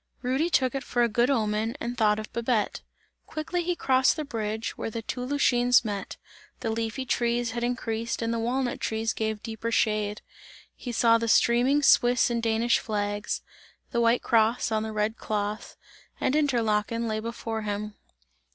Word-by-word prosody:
Rudy 265 +7 +1
took 260 -7 +2
it 275 - -3
for 240 -1 +1
a - - +4
good 235 +3 +2
omen 220 -1 0
and 240 +1 -4
thought 210 -3 +3
of 215 0 -7
Babette. 235 -2 0 0.5
Quickly 330 +3 -3
he 350 +1 -1
crossed 260 -4 +3
the 310 -2 -4
bridge, 220 -4 -3
where - - -4
the 225 +1 -5
two 250 - -4
Lütschines 250 -2 +3
meet; 205 -2 -4 0.4
the 225 - -1
leafy 225 +3 -3
trees 240 -1 0
had 235 +1 -3
increased 230 -1 -2
and 230 0 -1
the 230 - -1
walnut 245 +2 -1
trees 225 0 -1
gave 220 -1 -3
deeper 225 0 -4
shade. 210 -2 0 0.5
He 245 - -6
saw 230 0 +4
the 230 - -2
streaming 245 +6 +3
Swiss 245 -3 +4
and 235 -1 0
Danish 230 +1 +2
flags 205 -1 -2 0.5
the 235 - +1
white 235 +1 +3
cross 230 +1 +2
on 215 0 +1
the 220 0 -4
red 215 +1 -1
cloth 210 0 -3 0.4
and 260 - +1
Interlaken 230 -5 +1
lay 215 -1 -1
before 225 0 -4
him. 210 0 -4
230 Hz, 170 wpm, -27 LUFS, 220-245 Hz, 0.5 s, a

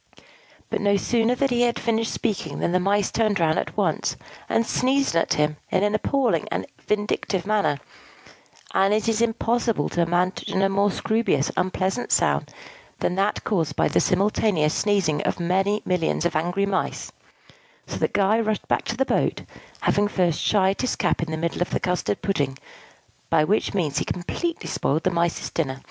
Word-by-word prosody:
But - - -1
no 200 0 +3
sooner 235 +4 +1
had 275 +1 0
he 240 0 +3
finished 225 -1 -1
speaking 185 -10 -2
than - - 0
the 185 - +2
Mice 200 +2 +1
turned 215 -4 +1
round 160 -1 +2
at - - -5
once, - - 0 0.3
and 230 - +2
sneezed 265 -4 +1
at 165 - +2
him 150 0 +1
in 190 - +1
an 205 0 +1
appalling 265 +4 +1
and - - -2 0.2
vindictive 205 -3 -1
manner 205 -9 +1 0.9
(and 195 +2 +3
it 215 - -1
is 225 0 +1
impossible 230 -5 0
to 175 - 0
imagine 180 +3 0
a 195 - +3
more 200 +1 +2
scroobious 215 -9 0
and - - -9
unpleasant 190 +5 -2
sound - - +2 0.5
than - - -1
that 195 +3 0
caused 170 -8 -1
by - - +2
the - - +2
simultaneous 190 -4 +2
sneezing 190 -8 +1
of - - -2
many 195 +4 +1
millions 175 -2 0
of 175 - 0
angry 175 +5 0
Mice); 195 -2 -2 0.7
so - - -6
that - - -1
Guy 205 +3 +3
rushed 215 -2 -1
back - - +1
to 225 - -3
the 265 - +2
boat, - - 0 0.4
having 205 0 +2
first 180 -6 0
shied 195 -2 +2
his 255 - 0
cap - - 0
into 165 - -2
the - - -1
middle 170 +2 -2
of 180 - 0
the - - -1
custard 180 - -1
pudding, 140 -9 -1 0.7
by 155 - +4
which 205 +5 0
means 155 -7 0
he - - -2
completely 335 - -3
spoiled 155 +4 0
the 185 - +2
Mice's 170 -1 -1
dinner. 135 -5 -2
195 Hz, 180 wpm, -24 LUFS, 170-215 Hz, 0.9 s, by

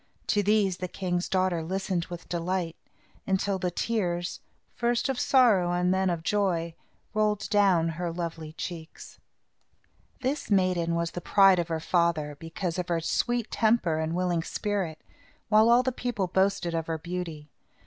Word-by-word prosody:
To 205 - +3
these 205 -2 +2
the 185 - -4
king's 180 -1 -2
daughter 185 -3 +1
listened 185 0 -2
with 175 -1 -9
delight, 175 -1 -2 0.5
until 190 0 0
the 180 - 0
tears, 175 -3 -2 0.3
first 240 +2 0
of 260 -2 -1
sorrow 215 -10 +4
and 180 +1 +2
then 190 0 +1
of 170 -2 -2
joy, 175 -4 0 0.4
rolled 215 -1 +1
down 190 -6 +4
her 170 +1 -3
lovely 165 -2 -5
cheeks. 165 -1 -8 1.0
This 270 +3 -2
maiden 180 -4 +2
was 170 0 -1
the 175 - -6
pride 195 0 +5
of 170 - -1
her 165 -1 -2
father, 160 -3 +1
because 165 +2 -4
of 180 - -3
her 170 -1 0
sweet 240 +7 -1
temper 215 -8 +2
and 160 +1 -2
willing 180 -2 0
spirit, 185 -4 -3 0.5
while 215 +1 +5
all 240 +2 +6
the 260 - 0
people 245 -5 -2
boasted 190 -1 +1
of 165 -1 -2
her 165 -1 -1
beauty. 165 -3 -6
180 Hz, 160 wpm, -27 LUFS, 170-205 Hz, 1.0 s, all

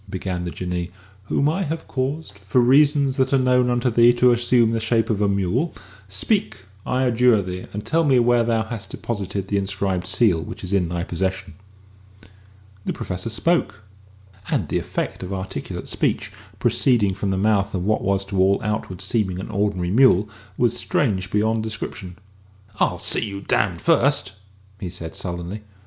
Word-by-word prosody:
began 90 -2 -3
the - - -3
Jinnee, 90 -1 -4 0.4
"whom 140 +7 +1
I 165 +6 0
have 160 -2 -4
caused, 130 -5 -3
for 100 +6 +1
reasons 140 +2 +4
that 130 - +1
are - - +6
known 125 -1 +3
unto 120 0 +1
thee, 120 +1 +6
to 125 +1 +4
assume 120 -1 +3
the 115 - 0
shape 115 +1 +1
of 105 -1 -1
a 100 - +3
mule, 100 - 0 0.3
speak, 100 - -1 0.3
I 130 +1 +1
adjure 120 -3 +3
thee, 90 0 -6
and 105 +1 -6
tell 165 0 +2
me 135 -4 +4
where 120 0 +4
thou 115 -1 +1
hast 110 -1 -7
deposited 100 -3 -4
the 100 0 +1
inscribed 95 -2 -2
seal 95 -3 +2
which 80 - -8
is 90 +1 -4
in 90 -4 +2
thy 85 0 -2
possession." 95 -1 -3 1.3
The - - -2
Professor 90 +4 -4
spoke; 110 -4 0 0.7
and - - -1
the - - +1
effect - - -4
of 95 0 -6
articulate 95 -6 -5
speech - - -1 0.3
proceeding 110 -7 +2
from 100 +1 -3
the 95 - 0
mouth 100 -1 +1
of 90 0 -2
what 110 +1 +1
was 100 0 0
to 95 -1 -3
all 95 +1 +4
outward 105 -4 -3
seeming 95 -2 -1
an 95 - -6
ordinary 100 -4 -1
mule 110 -4 +5 0.3
was 120 -1 +2
strange 95 -9 0
beyond 110 +2 +1
description. 110 -4 -6 0.6
"I'll - - +2
see - - -1
you 100 -3 -5
damned 95 -3 0
first," 140 - +2 0.5
he 90 - -5
said 85 -2 -7
sullenly. 90 +1 -5
105 Hz, 175 wpm, -22 LUFS, 95-120 Hz, 1.3 s, are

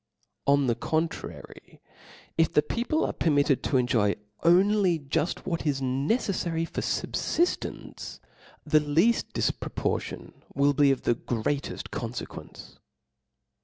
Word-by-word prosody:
On 140 0 +4
the 120 - +2
contrary, 160 +7 -4 0.6
if 165 -1 +3
the 150 - +4
people 240 - 0
are - - -2
permitted 145 -3 +2
to 135 - +2
enjoy 120 -5 +2 0.3
only 185 +1 +4
juft.what 160 +4 -2
is 140 -2 +1
nc 135 +2 -1
ceflary 170 -8 0
for - - -4
fubfiftence, 345 +1 -2 0.5
the 155 - +4
leaft 160 +10 +2
difproportion - - -2 0.2
will 140 +1 +4
be 140 0 +4
of 135 -2 +1
the - - +3
greateft 120 +4 -3
confequence. - - -7
150 Hz, 115 wpm, -27 LUFS, 135-170 Hz, 0.6 s, On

